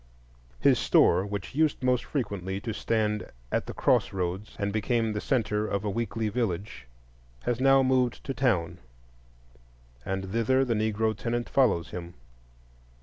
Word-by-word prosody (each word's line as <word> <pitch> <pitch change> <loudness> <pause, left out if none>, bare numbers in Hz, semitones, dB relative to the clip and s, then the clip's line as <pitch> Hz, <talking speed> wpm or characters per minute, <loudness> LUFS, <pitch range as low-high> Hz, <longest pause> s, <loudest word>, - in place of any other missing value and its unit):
His - - +4
store, 90 +4 +4
which 100 +1 -5
used 150 -2 +1
most 125 -1 +2
frequently 100 - -3
to 115 0 -4
stand 105 -1 -1 0.2
at - - -1
the - - -5
cross - - +2
roads 95 +2 -3
and 100 -1 -2
become 110 +1 0
the 105 - -3
centre 110 -5 0
of 100 0 -2
a 105 - 0
weekly 115 0 -2
village, 100 - -3 0.6
has 120 -1 -1
now 135 0 +5
moved 130 -2 +1
to 135 - -3
town; 115 -11 0 1.2
and 95 0 -3
thither 130 +4 +2
the 120 - 0
Negro 110 0 0
tenant 120 +3 -2
follows 95 -12 +2
him. 85 -1 -7
110 Hz, 145 wpm, -28 LUFS, 100-125 Hz, 1.2 s, now